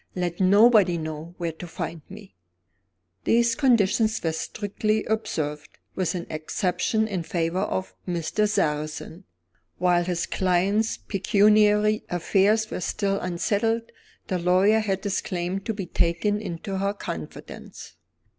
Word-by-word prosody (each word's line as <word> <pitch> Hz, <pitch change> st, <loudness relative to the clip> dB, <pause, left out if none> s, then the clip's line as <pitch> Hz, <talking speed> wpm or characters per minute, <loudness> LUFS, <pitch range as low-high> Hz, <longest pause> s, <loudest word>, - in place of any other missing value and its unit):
"Let 175 Hz, -2 st, -2 dB
nobody 200 Hz, -1 st, +5 dB
know 155 Hz, +1 st, -6 dB
where 170 Hz, -2 st, -2 dB
to 160 Hz, +2 st, -9 dB
find 165 Hz, 0 st, -5 dB
me." 200 Hz, 0 st, -12 dB, 0.9 s
These 235 Hz, 0 st, +3 dB
conditions 225 Hz, -4 st, +2 dB
were 165 Hz, -, +1 dB
strictly 215 Hz, +5 st, -2 dB
observed 150 Hz, -9 st, -3 dB, 0.2 s
with 185 Hz, -1 st, -1 dB
an 175 Hz, -1 st, -4 dB
exception 180 Hz, +7 st, -1 dB
in 190 Hz, -5 st, -2 dB
favor 165 Hz, +1 st, -1 dB
of 190 Hz, -1 st, -2 dB
Mr. 180 Hz, +5 st, 0 dB
Sarrazin. 155 Hz, 0 st, -2 dB, 0.5 s
While 175 Hz, -1 st, +3 dB
his 175 Hz, -2 st, -1 dB
client's 195 Hz, +4 st, +1 dB
pecuniary 210 Hz, +2 st, +3 dB
affairs 200 Hz, +5 st, +2 dB
were -, -, -4 dB
still 200 Hz, +2 st, -1 dB
unsettled, 220 Hz, +6 st, -1 dB, 0.3 s
the 185 Hz, -2 st, -2 dB
lawyer 185 Hz, +5 st, +4 dB
had 195 Hz, -3 st, -2 dB
his 200 Hz, -1 st, -1 dB
claim 180 Hz, +1 st, -3 dB
to 220 Hz, +3 st, -4 dB
be 195 Hz, -2 st, -4 dB
taken 175 Hz, +5 st, 0 dB
into 190 Hz, 0 st, -4 dB
her 200 Hz, +1 st, -1 dB
confidence. 80 Hz, -, -8 dB
190 Hz, 125 wpm, -25 LUFS, 175-210 Hz, 0.9 s, nobody